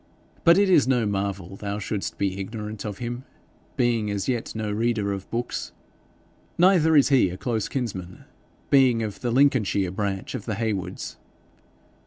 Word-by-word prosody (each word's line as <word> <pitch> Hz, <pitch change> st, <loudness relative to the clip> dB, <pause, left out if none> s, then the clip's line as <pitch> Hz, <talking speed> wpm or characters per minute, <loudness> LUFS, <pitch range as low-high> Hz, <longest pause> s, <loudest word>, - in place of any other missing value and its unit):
But 170 Hz, +1 st, +7 dB
it 200 Hz, 0 st, +4 dB
is 165 Hz, -9 st, +5 dB
no 125 Hz, -4 st, +2 dB
marvel 100 Hz, -2 st, -3 dB
thou 100 Hz, 0 st, -4 dB
shouldest 105 Hz, -1 st, -4 dB
be 100 Hz, -1 st, -1 dB
ignorant 105 Hz, +1 st, -6 dB
of 105 Hz, -2 st, -4 dB
him, 120 Hz, +2 st, -5 dB, 0.5 s
being 120 Hz, -4 st, +1 dB
as 100 Hz, -2 st, -2 dB
yet 120 Hz, -3 st, -2 dB
no 110 Hz, -1 st, -2 dB
reader 110 Hz, -2 st, 0 dB
of 95 Hz, -1 st, -7 dB
books. 120 Hz, +1 st, -3 dB, 0.8 s
Neither 175 Hz, -3 st, +5 dB
is 140 Hz, -3 st, +6 dB
he 130 Hz, -9 st, +4 dB
a 90 Hz, -, -6 dB
close 110 Hz, +1 st, -1 dB
kinsman, 95 Hz, -9 st, -5 dB, 0.5 s
being 130 Hz, -5 st, +5 dB
of 105 Hz, -3 st, -5 dB
the 120 Hz, -, -1 dB
Lincolnshire 115 Hz, -8 st, +2 dB
branch 95 Hz, 0 st, -3 dB
of -, -, -5 dB
the 110 Hz, -, -2 dB
Heywoods.' 95 Hz, -4 st, -3 dB
110 Hz, 160 wpm, -25 LUFS, 100-125 Hz, 0.8 s, But